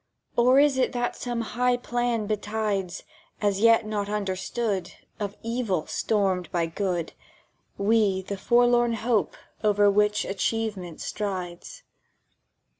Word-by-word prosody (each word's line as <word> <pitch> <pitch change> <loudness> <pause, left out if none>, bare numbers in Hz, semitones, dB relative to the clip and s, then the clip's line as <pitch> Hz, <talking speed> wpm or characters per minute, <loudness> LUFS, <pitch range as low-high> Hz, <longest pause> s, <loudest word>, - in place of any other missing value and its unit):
"Or 250 +2 +5
is 280 -2 +4
it 255 - +1
that 245 -1 -1
some 240 -2 -3
high 245 +2 +1
Plan 240 -2 -1
betides, 210 -3 -2 0.4
As 200 -2 +1
yet 230 0 +5
not 205 -1 -2
understood, 200 0 -2 0.3
Of 205 -1 -4
Evil 230 -8 -1
stormed 190 -4 0
by 170 -1 +1
Good, 175 0 -2 0.6
We 200 -2 +2
the 200 +2 -4
Forlorn 240 +3 +3
Hope 225 -5 0 0.3
over 205 -1 +4
which 210 +1 +2
Achievement 200 -4 -2
strides?" 195 - -5
210 Hz, 115 wpm, -26 LUFS, 195-235 Hz, 0.6 s, Or